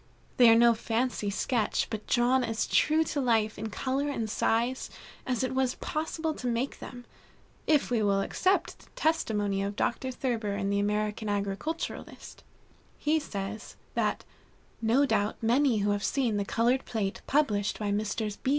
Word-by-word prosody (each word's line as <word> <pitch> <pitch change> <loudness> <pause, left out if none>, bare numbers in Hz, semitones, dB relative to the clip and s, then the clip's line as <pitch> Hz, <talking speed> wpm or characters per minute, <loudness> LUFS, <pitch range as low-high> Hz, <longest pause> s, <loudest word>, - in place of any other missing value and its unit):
They 245 -2 +8
are 225 - +7
no 235 0 +6
fancy 225 -1 -1
sketch, 215 +3 0
but 215 -2 -5
drawn 250 +1 +3
as 225 -1 -1
true 315 +1 +3
to 295 -2 -2
life 225 -4 +1
in 220 +1 -4
color 265 +7 -1
and 230 -6 -2
size 235 +4 0 0.4
as 250 -1 0
it 260 0 -1
was 260 -1 +1
possible 320 +1 -3
to 250 - -5
make 240 +3 -1
them, 245 -1 -9 0.6
if 300 -5 +3
we 235 -3 +2
will 200 -1 +2
accept 375 - 0
the - - -19
testimony 210 -11 0
of 200 +1 -3
Dr. 260 +4 -1
Thurber 235 -5 -2
in 200 -1 -1
the 200 - +1
American 210 +1 -1
Agriculturist. 205 +11 -4 0.5
He 310 +2 +1
says, 210 -5 -6 0.2
that - - -1 0.6
"no 235 +5 +3
doubt 205 -6 +1
many 240 +2 +3
who 205 - +2
have 205 0 -1
seen 245 -6 +1
the 200 - -1
colored 240 +5 +1
plate 210 -3 -3
published 210 -9 +1
by 205 -1 -2
Messrs. 210 0 -2
230 Hz, 160 wpm, -29 LUFS, 210-260 Hz, 0.6 s, They